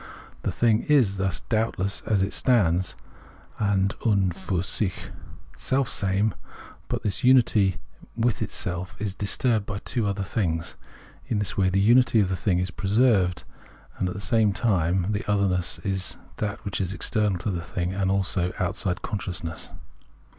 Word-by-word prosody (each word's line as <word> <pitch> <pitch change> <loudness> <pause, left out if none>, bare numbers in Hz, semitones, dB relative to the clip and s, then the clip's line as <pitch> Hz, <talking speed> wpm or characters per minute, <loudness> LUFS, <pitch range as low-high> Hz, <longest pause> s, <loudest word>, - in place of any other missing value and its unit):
The - - -1
thing 115 -2 +2
is, 120 -10 +4
thus, 95 -3 -1
doubtless 110 -4 -1
as 100 -3 +2
it 100 - -2
stands 95 -8 +2 0.6
{an 100 -2 +2
und 100 -6 +2
fur 95 -2 -2
sich) 95 0 -1 0.4
selfsame, 105 -6 0 0.6
but - - -3
this 100 - -2
unity 115 -7 +4 0.4
with 115 -1 0
itself 90 +1 -3
is 100 -2 -3
disturbed 105 +2 0
by 100 -1 -4 0.2
other 100 -1 -1
things. 85 -5 -2 0.5
In 110 - 0
this 105 -1 -1
way 95 -2 +2
the 95 +1 +1
unity 120 +3 +5
of 100 -3 +2
the 95 - 0
thing 90 0 0
is 90 0 -1
preserved, 100 -2 +2 0.6
and, 90 - 0
at - - -5
the 100 - -6
same 110 -2 +2
time, 95 -3 +1
the 105 0 -2
otherness 95 -3 +1 0.6
that 105 -1 -3 0.2
is 95 -1 -1
external 105 0 0
to 100 - -3
the 85 -2 -3
thing, 90 +1 -3
and 95 0 0
also 95 -2 0
out - - -1
side 90 -2 -2
consciousness. 90 -5 -4
100 Hz, 150 wpm, -25 LUFS, 90-110 Hz, 0.6 s, unity